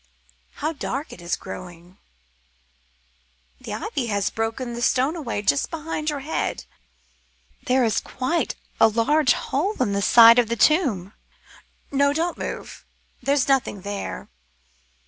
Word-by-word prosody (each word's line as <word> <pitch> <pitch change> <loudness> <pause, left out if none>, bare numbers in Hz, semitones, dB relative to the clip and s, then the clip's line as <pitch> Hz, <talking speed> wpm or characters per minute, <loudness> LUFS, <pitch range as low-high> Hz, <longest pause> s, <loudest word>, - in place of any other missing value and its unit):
How 310 +3 -2
dark 280 0 -4
it - - -12
is 175 0 -1
growing. 175 +1 -10 1.6
The - - -6
ivy 255 -4 -3
has 200 -2 0
broken 225 +2 -3
the 235 - -5
stone 265 +6 +2
away 235 -10 -4
just 140 -8 +1
behind 310 -1 -3
your 290 -2 -3
head: 305 +4 -3 1.0
there 255 0 +3
is 220 - +1
quite 260 +7 -2 0.2
a - - +7
large 250 +5 +3
hole 380 +10 -2
in 200 - +1
the 200 - 0
side 230 +3 +8
of 235 -2 +1
the 235 - 0
tomb. 230 - +2 0.8
No, 280 0 +3
don't 335 +3 -1
move, - - -6 0.4
there's 275 +1 +1
nothing 270 -7 +1
there. 200 +1 -5
250 Hz, 135 wpm, -23 LUFS, 210-290 Hz, 1.6 s, side